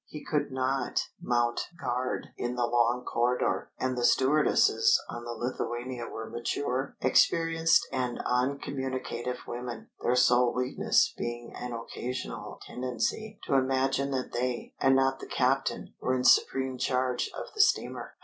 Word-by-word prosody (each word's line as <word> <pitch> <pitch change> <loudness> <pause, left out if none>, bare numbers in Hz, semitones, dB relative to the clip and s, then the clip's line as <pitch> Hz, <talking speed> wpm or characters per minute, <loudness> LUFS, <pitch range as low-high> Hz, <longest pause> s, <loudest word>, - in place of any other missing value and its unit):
He 150 - -9
could 145 -2 -1
not 130 0 -1
mount 120 -1 +1 0.2
guard 125 +1 -2
in 120 0 -3
the 120 -1 +1
long 120 +1 +2
corridor; 120 +1 0
and 130 0 -1
the 120 - -2
stewardesses 150 - +4
on 120 0 -6
the 120 - -4
Lithuania 120 0 -4
were 110 0 -6
mature, 125 +3 -2
experienced 165 0 +3
and 125 -2 -2
uncommunicative 130 -1 -2
women, 120 -1 -6
their 125 - +2
sole 125 -1 +4
weakness 125 +1 +2
being 120 0 -5
an 125 0 -5
occasional 125 +2 -5
tendency 130 - -3
to - - -2
imagine 135 +1 +2
that 130 -2 -2
they, 125 0 -2
and 135 0 +4
not 135 0 +2
the - - -8
captain, 135 +2 0
were 130 - +1
in 125 - -1
supreme 130 0 +3
charge 125 -1 0
of - - -7
the 430 - +3
steamer. 400 - +1
125 Hz, 140 wpm, -29 LUFS, 120-135 Hz, 0.2 s, stewardesses